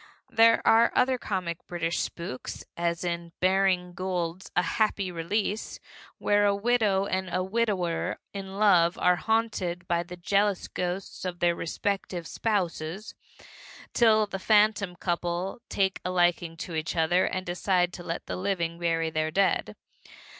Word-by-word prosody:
There 230 -1 +5
are 230 +1 +5
other 255 0 +3
comic 180 -6 -4
British 170 -1 -2
spooks, 150 -7 -5
as 170 0 -1
in 170 -1 -3
Baring 185 -1 +2
Gould's 185 -1 -3
A 180 - +3
Happy 200 -2 0
Release, 200 +5 -2 0.4
where 205 0 +2
a 200 -1 +3
widow 210 -3 +2
and 190 -1 -2
a 185 - 0
widower 190 -5 -1 0.2
in 195 -1 -6
love 180 -5 +4
are 180 0 +3
haunted 190 -6 -1
by 170 -1 +1
the 175 +1 -9
jealous 200 +2 +1
ghosts 180 +2 -4
of 180 -1 -3
their 175 0 +2
respective 180 0 -3
spouses, 190 -2 -2 0.8
till 220 -2 +5
the 195 -2 -6
phantom 210 -2 +3
couple 175 +4 -2
take 190 -1 0
a - - -2
liking 175 -2 +1
to 170 - -6
each 160 +2 -2
other 175 +3 +3
and 185 0 -3
decide 180 0 +1
to - - -7
let 170 -1 -4
the - - -4
living 175 -3 -2
bury 165 -1 0
their 155 0 0
dead. 195 +5 +1
185 Hz, 145 wpm, -27 LUFS, 170-200 Hz, 0.8 s, There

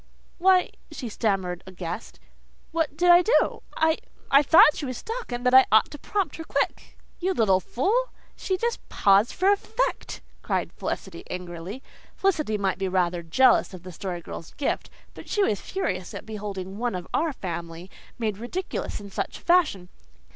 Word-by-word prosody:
"Why," 370 0 +4 0.2
she 245 - -6
stammered 195 -5 -1
aghast, 185 +3 -7 0.5
"what 320 -3 -1
did 350 +1 +5
I 350 0 +8
do? 440 +7 +2 0.2
I 320 0 +2 0.3
I 275 - +8
thought 300 0 +7
she 285 - -4
was 255 -2 -4
stuck 460 - -6
and 245 +1 -4
that 250 - +3
I 260 0 +8
ought 220 0 +5
to 295 - -9
prompt 390 -3 -2
her 325 - -6
quick." - - -2 0.2
"You 370 +1 0
little 195 - +4
fool, 400 - 0 0.3
she 375 - -2
just 470 +3 -1
paused 200 +3 +4
for 380 +3 +3
effect," 445 +4 -2 0.2
cried - - -2
Felicity 180 -3 -5
angrily. 180 +6 -6 0.3
Felicity 310 - +1
might 195 -2 -1
be 195 - 0
rather 180 -2 0
jealous 190 +4 +3
of 180 - -12
the 185 - -8
Story 180 0 -5
Girl's 165 - -9
gift, 280 - -2 0.2
but - - -12
she 415 - +2
was 210 - 0
furious 185 - -3
at - - -7
beholding 200 -2 -6
"one 240 -4 -1
of 180 -1 -6
our 325 0 +1
family" 170 - -6 0.3
made 215 -4 -2
ridiculous 355 +7 -4
in 200 -1 -10
such - - -3
a - - -16
fashion. 325 - +2
225 Hz, 175 wpm, -25 LUFS, -, 0.5 s, I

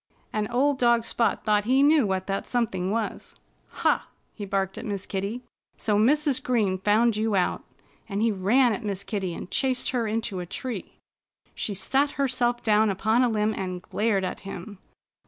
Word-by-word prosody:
And 215 -1 -1
old 270 +3 +2
dog 235 -1 +3
Spot 230 - 0
thought 210 -1 +2
he 260 +4 +4
knew 290 -5 +5
what 190 -1 -1
that 195 0 -3
something 195 -7 -1
was. 220 0 -3 0.5
"Ha!" - - +2 0.3
he 205 - -7
barked 195 -1 -1
at - - -7
Miss 200 -4 -4
Kitty. 200 +6 -4 0.3
"So 210 - +1
Mrs. 270 +5 +3
Green 215 -8 +1
found 215 +4 +3
you 215 -1 0
out!" 185 - 0 0.5
And 200 0 -2
he 225 +1 +2
ran 220 +6 +3
at 230 - -5
Miss 200 -2 -3
Kitty 190 -4 -3
and - - -8
chased 260 -2 0
her 240 -3 -1
into 215 -3 -2
a 175 - -5
tree. 230 +1 -5 0.6
She 205 - -3
sat 270 +8 +1
herself 245 -3 0
down 215 0 +4
upon 215 +5 +2
a 250 - +3
limb 215 -1 +1
and 185 -2 -4
glared 210 -3 0
at 180 - -4
him. 195 +1 -8
215 Hz, 180 wpm, -26 LUFS, 195-245 Hz, 0.6 s, knew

